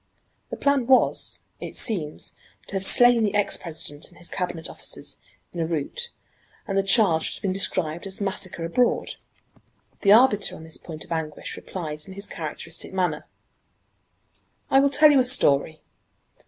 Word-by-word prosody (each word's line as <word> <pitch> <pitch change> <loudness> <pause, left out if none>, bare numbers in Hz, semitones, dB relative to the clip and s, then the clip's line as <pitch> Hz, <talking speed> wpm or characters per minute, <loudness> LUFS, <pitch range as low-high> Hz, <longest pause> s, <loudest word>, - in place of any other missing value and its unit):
The - - -7
plan 280 -4 0
was, 260 -1 +2 0.2
it - - -8
seems, 165 -10 -2 0.3
to - - -12
have 195 -1 -1
slain 245 +3 +7
the 205 -1 -1
ex 205 -1 +3
President 155 -3 -4
and 175 - -20
his 175 - -4
Cabinet 175 -3 -5
officers - - -4 0.3
in 175 - -7
a 165 - -1
rout, 170 - -4 0.6
and 195 - -3
the 195 - +3
charge 195 -5 +4
would - - -3
have - - -9
been 190 -2 -1
described 180 -2 0
as 195 - -2
massacre 190 -4 -1
abroad. 240 +9 -1 0.8
The 200 - +3
arbiter 215 -2 +4
on - - -12
this 160 0 -5
point 155 -2 -10
of - - -22
anguish 160 -2 -5
replied 155 -4 -7
in 190 - -10
his 200 +2 -3
characteristic 160 -2 -6
manner: 180 -5 -2 1.4
"I 270 - +5
will 280 +1 +3
tell 295 +2 +6
you 280 - +4
a - - +3
story. 155 - +4
190 Hz, 170 wpm, -23 LUFS, 160-220 Hz, 1.4 s, slain